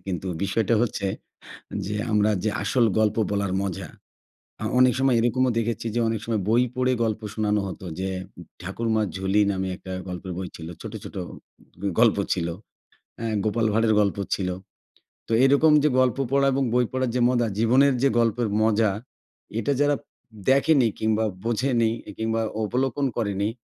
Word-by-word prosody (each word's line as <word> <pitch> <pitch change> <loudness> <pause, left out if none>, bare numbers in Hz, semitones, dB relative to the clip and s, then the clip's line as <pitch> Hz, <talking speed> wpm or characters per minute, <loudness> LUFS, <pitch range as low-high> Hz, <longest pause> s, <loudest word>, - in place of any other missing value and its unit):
কিন্তু 95 0 -3 0.2
বিষয়টা 105 +3 +1
হচ্ছে 100 -4 -1 0.8
যে, 105 - -3 0.2
আমরা 105 0 +3
যে 110 - +1
আসল 120 -3 +2
গল্প 105 -1 +2 0.2
বলার 100 -2 -1
মজা, 95 -3 -4 0.7
আ - - -3 0.2
অনেক 125 -1 +6
সময় 135 -2 +3
এরকমও 125 +2 +2
দেখেছি 115 0 -2
যে - - +2
অনেক 115 -1 -1
সময় 110 -3 -1
বই 120 +2 +4
পড়ে 130 0 +1
গল্প 110 -1 -1
শোনানো 105 -1 +1
হতো 95 0 -8
যে, 95 0 -2 0.5
'ঠাকুরমা 110 +4 -1
ঝুলি' 95 +2 +2
নামে 95 -1 -2
একটা 95 - -10 0.2
গল্পের 90 0 -6
বই 95 0 -4
ছিল। 80 -1 -8
ছোটো, 110 0 -6
ছোটো 100 - -7 0.6
গ - - -11 0.2
গল্প 115 -3 +5 0.2
ছিল। 85 -2 -2 0.7
অ্যা 115 - -4 0.2
'গোপাল 110 +1 +1
ভাঁড়ের' 110 0 +3
গল্প 100 -2 +1 0.2
ছিলো। 90 -2 -2 0.7
তো - - -8
এরকম 140 +4 +5
যে, 150 - +4
গল্প 130 0 +2
পড়া 140 0 +3
এবং 135 +1 +1
বই 125 0 +3
পড়ার 130 -1 -1
যে 125 - +1
মজা, 120 -2 +1
জীবনের 130 +5 +4
যে 140 - +5
গল্পের 115 0 +1
মজা, 110 0 +3 0.7
এটা 130 - 0
যারা 145 0 +3 0.5
দেখেনি 135 -1 +4
কিংবা 110 0 +1 0.2
বোঝেনি 115 0 +1 0.3
কিংবা 115 0 -1 0.2
অবলোকন 130 +4 0
করেনি। 100 -2 -1
110 Hz, 160 wpm, -24 LUFS, 100-125 Hz, 0.8 s, অনেক